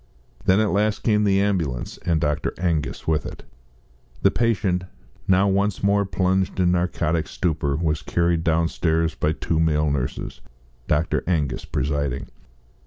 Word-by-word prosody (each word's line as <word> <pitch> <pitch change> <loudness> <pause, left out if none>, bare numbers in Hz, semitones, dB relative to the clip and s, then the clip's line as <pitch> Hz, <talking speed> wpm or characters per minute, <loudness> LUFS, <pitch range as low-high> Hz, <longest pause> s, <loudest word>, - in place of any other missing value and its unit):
Then 95 +2 +4
at 110 -2 +2
last 105 +2 0
came 105 -2 +3
the 100 -1 +3
ambulance, 85 -12 -1
and 85 -2 0
Dr. 75 -1 -1
Angus 85 -6 -2
with 75 -3 +1
it. - - -8 0.8
The 100 - +5
patient, 100 -6 0 0.4
now 95 +1 +4
once 100 +1 0
more 100 0 +3
plunged 95 0 0
in 90 -1 +3
narcotic 85 -2 0
stupor, 75 -5 -1
was 75 -1 -1
carried 85 +1 0
downstairs 80 0 +1
by 80 0 0
two 80 0 -1
male 75 -2 +2
nurses, 65 -1 -3 0.5
Dr. 80 +3 +1
Angus 75 -8 -1
presiding. 70 -1 -2
85 Hz, 140 wpm, -23 LUFS, 75-95 Hz, 0.8 s, The